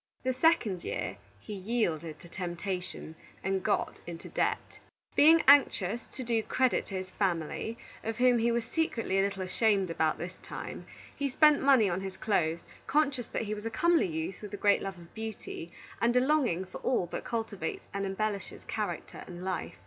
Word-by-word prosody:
The 260 0 +1
second 245 - +2
year 95 - -3 0.2
he 210 - -8
yielded 180 -7 -1
to - - -12
temptation, 180 -1 -4 0.3
and 190 0 0
got 205 +1 0
into 170 -1 -7
debt. - - -1 0.4
Being 320 +3 +7
anxious 235 -6 +5
to 260 - -7
do 230 -2 +1
credit 255 +3 +1
to 195 - -6
his 185 0 -4
family, 190 +4 -1 0.3
of 225 0 -3
whom 250 -1 +5
he 235 +1 +2
was 235 -1 0
secretly 230 -12 0
a - - +5
little 195 -1 -1
ashamed 195 -1 +2
about 160 -2 +1
this 175 +2 -6
time, - - -7 0.3
he 280 -1 -1
spent 300 +3 +5
money 265 -6 +6
on 180 0 -1
his 190 -1 -6
clothes, 170 -6 +1 0.3
conscious 280 -5 +1
that - - -2
he 215 -1 -3
was 210 +1 -4
a - - -1
comely 335 - +3
youth 160 +3 -4
with 210 -1 -6
a - - -7
great 205 +1 +4
love 195 -1 -4
of 170 -1 -14
beauty, 220 -6 -6 0.3
and 235 +1 +3
a - - +7
longing 255 - +2
for 185 - -9
all 250 -8 +1
that 175 - -5
cultivates 225 -4 -3
and 200 0 -2
embellishes 200 +1 -3
character - - -4
and 175 0 -8
life. 185 - -3
205 Hz, 185 wpm, -30 LUFS, 185-240 Hz, 0.4 s, Being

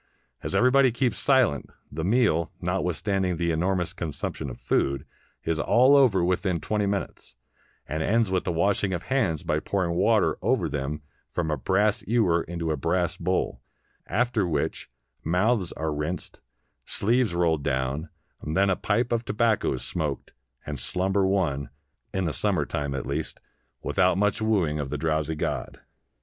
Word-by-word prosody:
As - - -3
everybody 130 +1 +5
keeps 120 0 0
silent, 130 - +3 0.2
the 80 +2 -4
meal, 95 -5 +2
notwithstanding 90 +1 -1
the 85 0 0
enormous 90 +1 0
consumption 80 -6 -4
of - - -9
food, 70 -1 0 0.4
is 80 -1 -1
all 130 - +5
over 120 -10 +5
within 90 -1 0
twenty 105 +2 -1
minutes, 100 -9 -4 0.5
and 80 +1 -2
ends 110 +3 +2
with 95 -1 +1
the 90 - -1
washing 100 +3 +1
of 85 -1 -3
hands 95 - +1
by - - 0
pouring 95 -4 -1
water 85 - +2
over - - +1
them 75 +1 -3 0.3
from 80 -3 -2
a - - +1
brass 100 - +1
ewer 105 -8 +3
into 85 -1 -3
a - - +1
brass 85 +5 0
bowl; 90 +2 -1 0.5
after 110 -1 +1
which 75 -4 -2 0.3
mouths 90 +3 +1
are 80 -1 -2
rinsed, 75 +4 -4 0.4
sleeves 115 -2 +1
rolled 80 -3 +2
down, 70 +4 -2 0.3
then 95 +6 +1
a - - +2
pipe 115 +6 0
of 115 -1 +1
tobacco 110 -1 +1
is - - -5
smoked, 75 -5 -3 0.3
and 75 -3 -5
slumber 95 +1 +1
won, 75 -8 0 0.4
in 95 - -1
siunmer 85 -1 0
time, 70 -1 -2
at 65 - -3
least, 75 +3 -3 0.4
without 95 -1 +2
much 105 +1 +1
wooing 95 -9 +1
of 70 -2 -3
the 75 - -3
drowsy 80 0 0
god. - - -3
90 Hz, 155 wpm, -26 LUFS, 80-105 Hz, 0.5 s, everybody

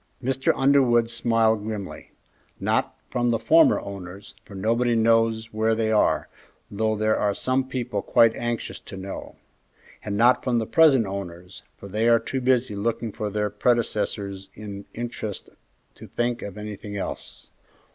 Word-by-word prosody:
Mr. 135 +1 +1
Underwood 130 -4 +3
smiled 115 -2 +2
grimly. 105 -3 -6 0.5
"Not - - 0
from 120 -1 +1
the 115 - +2
former 165 +7 +5
owners, 100 0 -9
for 100 - -13
nobody 115 +4 +1
knows 115 0 +2
where 110 +1 +1
they 110 -1 0
are, 110 - +2 0.4
though 110 +1 0
there 110 +1 +1
are 100 -1 +1
some 130 0 -1
people 125 -2 -2
quite 115 -1 +4
anxious 120 -1 -3
to 95 - -10
know; 95 +1 -7 0.7
and 100 -1 -3
not 120 +3 +4
from 125 -2 +1
the 115 - 0
present 140 -4 +5
owners, 90 -2 -7 0.2
for 100 - -10
they 110 +4 0
are 115 - +6
too 130 +3 -4
busy 125 -3 +1
looking 115 +2 -2
for 105 +1 -4
their 105 0 -1
predecessors 105 -3 -1
in 100 -1 -8
interest 115 -3 -5 0.4
to - - -12
think 120 0 -2
of 100 0 -7
anything 105 -1 -7
else." 95 - -6
110 Hz, 155 wpm, -24 LUFS, 105-120 Hz, 0.7 s, are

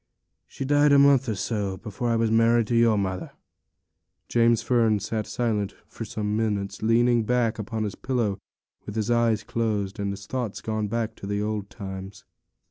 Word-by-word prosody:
She 135 - -6
died 145 +1 +4
a 140 - +7
month 140 -3 +5
or 110 - -1
so 100 -2 -2
afore 115 +3 -3
I 115 - +2
was 115 -1 +1
married 115 +1 +4
to 120 - +1
your 115 -2 +4
mother.' 95 -2 -3 1.0
James 115 -1 +3
Fern 115 -3 +3
was 100 -1 -3 0.2
silent 110 -4 -1
again - - -27
for 115 - -8
some 105 0 -2
minutes, 105 -3 -2
leaning 120 +2 +3
back 115 0 0
upon 110 +1 -3
his 105 -2 -3
pillow, 115 -7 -1 0.5
with 105 - -6
his 110 +1 0
eyes 115 -3 +2
closed, 105 -3 -2
and 100 0 -1
his 100 0 -7
thoughts 120 -3 -3
gone 110 -1 -2
back 115 +1 -2
to 100 - -8
the 100 0 -1
old 105 -1 -3
times. 95 -1 -8
110 Hz, 185 wpm, -25 LUFS, 100-120 Hz, 1.0 s, a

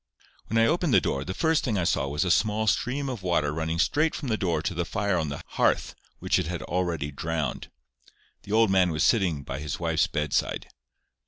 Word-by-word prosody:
When 115 - -1
I 115 - +5
opened 165 -1 +2
the - - +8
door, 70 - -2
the 95 +3 -5
first 160 -1 +2
thing 110 -6 0
I 90 - +1
saw 70 -4 +1
was 75 +6 -1
a 90 - +1
small 110 +3 +2
stream 135 +6 0
of 125 -6 -4
water 85 -5 +1
running 80 +1 -2
straight 150 - +2
from 140 - -4
the 110 - +2
door 85 -7 -1
to 85 - -1
the 85 0 -1
fire 100 +2 -1
on 80 -4 -1
the 70 - -6
hearth, - - +1 0.2
which - - +1
it 90 - -2
had 85 -1 -4
already 85 -5 -2
drowned. 80 -2 -3 0.7
The 100 - -10
old 110 -1 +4
man 95 -2 +4
was 80 -1 0
sitting 90 - +2
by 65 +1 -5
his 75 -2 -4
wife's 85 0 +1
bedside. 75 -3 -1
90 Hz, 220 wpm, -26 LUFS, 80-110 Hz, 0.7 s, the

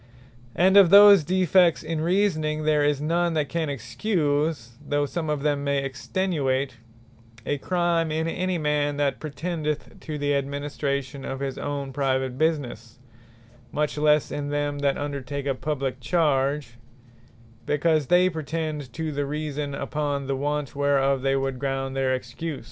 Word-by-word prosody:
And 190 +3 +5
of 195 -4 +8
those 200 -2 +9
defects 180 0 +3
in 160 0 -3
Reasoning, 160 -4 +1
there 150 -1 +3
is 145 -1 +2
none 170 +2 0
that 150 -2 0
can 165 -3 -1
Excuse 145 - -1
(though 145 0 0
some 160 +2 -4
of 150 -2 -1
them 145 -2 0
may 140 -1 0
Extenuate) 135 -3 -1 0.7
a 145 - -1
Crime, 170 -1 0
in 160 +1 -1
any 185 +2 -1
man, 150 -2 0
that 145 -1 0
pretendeth 155 0 -4
to 155 -1 -6
the 145 0 0
administration 140 -1 -3
of 135 0 -5
his 135 -1 -4
own 140 -2 -4
private 130 -2 0
businesse; 130 -7 -2 0.7
much 150 0 -1
lesse 150 0 +2
in 145 0 -3
them 145 0 -1
that 140 -1 +1
undertake 140 -1 -4
a 140 - +1
publique 135 -1 -3
charge; 135 -2 0 0.9
because 150 -1 +2
they 180 +1 +5
pretend 155 -4 -4
to 160 -1 -3
the 145 -1 -2
Reason, 150 -1 -3
upon 140 0 -2
the 135 0 -1
want 145 0 -2
whereof 140 -1 +2
they 135 0 +1
would 135 -1 -2
ground 135 -1 -2
their 130 -1 +1
Excuse. 130 +4 -5
145 Hz, 150 wpm, -25 LUFS, 135-160 Hz, 0.9 s, those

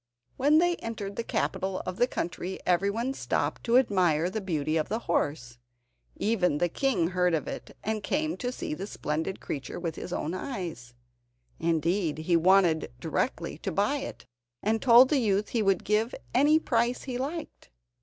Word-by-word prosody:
When 295 +3 +4
they 350 +1 +3
entered 205 -3 -5
the 230 - -2
capital 190 -4 -2
of 185 0 -4
the 245 - +3
country 180 -2 -4
everyone 200 +8 +1
stopped - - -2
to 240 0 +5
admire 180 -8 +2
the 220 - -3
beauty 155 -5 -1
of 155 - 0
the 215 - 0
horse. 125 -7 -1 0.6
Even 190 -8 +1
the 175 +3 +1
king 210 -6 +1
heard 180 -2 +2
of 155 - -3
it, - - -7
and 220 0 -1
came 310 +8 -1
to 245 -1 -2
see 250 - -4
the 190 +6 -5
splendid 160 +1 -3
creature 140 +3 -5
with 165 -2 -4
his 180 - -6
own 165 -2 -2
eyes. 175 - -5 0.6
Indeed, 165 +1 0
he 160 +2 +1
wanted 170 - +4
directly - - -2
to - - -3
buy - - +1
it, - - -7 0.4
and 220 +2 +1
told 250 +1 +7
the 290 - +3
youth 210 -3 +1
he 235 - 0
would 195 -3 +2
give 215 +3 +1 0.2
any 290 +5 +5
price 240 -5 0
he 250 -2 -4
liked. 300 - -5
195 Hz, 175 wpm, -28 LUFS, 170-235 Hz, 0.6 s, told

